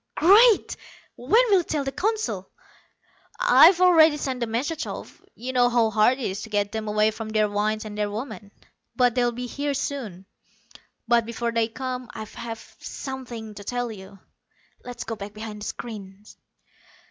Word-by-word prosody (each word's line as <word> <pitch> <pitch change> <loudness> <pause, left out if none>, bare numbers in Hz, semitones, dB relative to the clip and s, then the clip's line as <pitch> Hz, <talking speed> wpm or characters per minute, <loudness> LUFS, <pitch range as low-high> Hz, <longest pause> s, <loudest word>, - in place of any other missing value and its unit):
"Great! 415 +7 +5 0.4
When 430 - +3
will 390 - +6
you - - -1
tell 300 -3 -2
the 270 - -3
Council?" 435 +8 -2 0.9
"I've - - +7
already 325 -4 +6
sent 265 -3 -3
the 235 - -1
message 275 +8 -2
off. - - -8
You 255 +3 -6
know 245 -1 +4
how 235 -2 +2
hard 215 +4 +3
it 270 - -6
is 195 -2 -3
to - - -8
get 205 -1 0
them 220 -1 -4
away 215 +1 +2
from 220 0 -7
their 215 -1 +2
wines 215 +1 -1
and 210 -1 -7
their 210 0 -1
women 215 -1 -7 0.4
but 245 -2 +3
they'll 245 -1 +1
be 245 +1 -5
here 285 +3 -3
soon. 235 -10 -4 0.8
But 235 -1 +3
before 235 0 -2
they 230 -1 +1
come, 255 +1 -5
I've 215 -1 -8 0.4
something 240 -5 -7
to 205 0 -10
tell 245 +2 -3
you. 195 -1 -11 0.7
Let's 245 -1 -7
go 225 - -5
back 205 0 -8
behind 215 -1 -7
the - - -5
screens." 205 -2 -9
235 Hz, 170 wpm, -24 LUFS, 215-265 Hz, 0.9 s, I've